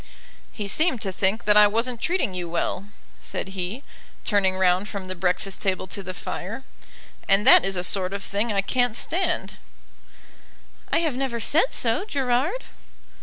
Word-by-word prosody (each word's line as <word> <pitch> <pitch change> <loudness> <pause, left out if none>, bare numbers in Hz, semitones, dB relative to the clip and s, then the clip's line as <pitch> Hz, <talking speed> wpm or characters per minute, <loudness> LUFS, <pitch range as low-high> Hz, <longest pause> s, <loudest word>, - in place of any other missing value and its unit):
"He 205 -2 -5
seemed 310 - +1
to 195 - -2
think 190 +4 0
that 210 0 +5
I 210 0 +8
wasn't 230 +3 -1
treating 350 - 0
you 175 -2 -4
well," 180 +3 -2 0.3
said - - -4
he, 190 +7 -5 0.4
turning 195 -3 +2
round 185 +2 +2
from 200 -2 -5
the 185 - -4
breakfast 185 +2 -2
table 190 -2 -1
to 195 +2 -5
the 185 -1 -7
fire, 215 +10 -6 0.7
"and 195 +2 +4
that 265 - +8
is 195 0 0
a 180 - -1
sort 185 0 +1
of 200 0 -4
thing 210 +3 -1
I 200 -1 +2
can't 245 +1 +1
stand." 360 +9 -2 1.3
"I - - +3
have 315 -6 -1
never 255 -3 -2
said 315 - +2
so, 230 +8 +1
Gerard." 285 - 0
205 Hz, 170 wpm, -24 LUFS, 190-250 Hz, 1.3 s, I